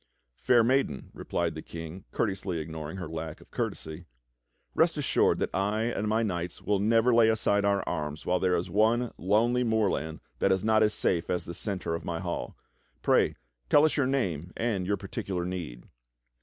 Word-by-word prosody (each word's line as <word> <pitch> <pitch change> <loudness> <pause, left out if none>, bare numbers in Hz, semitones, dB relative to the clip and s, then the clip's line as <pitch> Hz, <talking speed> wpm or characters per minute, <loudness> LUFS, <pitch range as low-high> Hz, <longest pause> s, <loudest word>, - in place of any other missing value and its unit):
"Fair 120 -2 +4
maiden," 125 - 0
replied 85 -2 -2
the 80 - -6
King, 85 +4 -8
courteously 95 -4 -1
ignoring 80 +2 -5
her 90 -3 -5
lack 80 0 -6
of - - -19
courtesy, 80 +2 -4 0.7
"rest - - +3
assured - - +2
that - - -2
I 105 +3 0
and 115 -2 -1
my 110 +2 +2
knights 90 -4 -3
will 105 -1 0
never 115 +4 +3
lay 115 -1 +6
aside 100 -2 +2
our 100 -1 +1
arms 75 -2 -3
while 90 - +2
there 90 -1 +2
is 85 - -1
one 115 +3 +2
lonely 115 +6 +2
moorland 105 -9 0 0.2
that - - +3
is 95 0 +1
not 110 0 +4
as 105 -1 +3
safe 85 -2 0
as 90 -1 -1
the 85 - -6
centre 95 -2 -3
of 85 - -3
this 85 -1 -3
hall. 85 -1 -4 0.5
Pray - - +3 0.3
tell 145 - +6
us 155 - +1
your 140 -4 +2
name 90 - -1
and 105 -6 -1
your 100 0 +1
particular 95 -2 -4
need." 85 -10 -6
95 Hz, 185 wpm, -28 LUFS, 85-110 Hz, 0.7 s, lay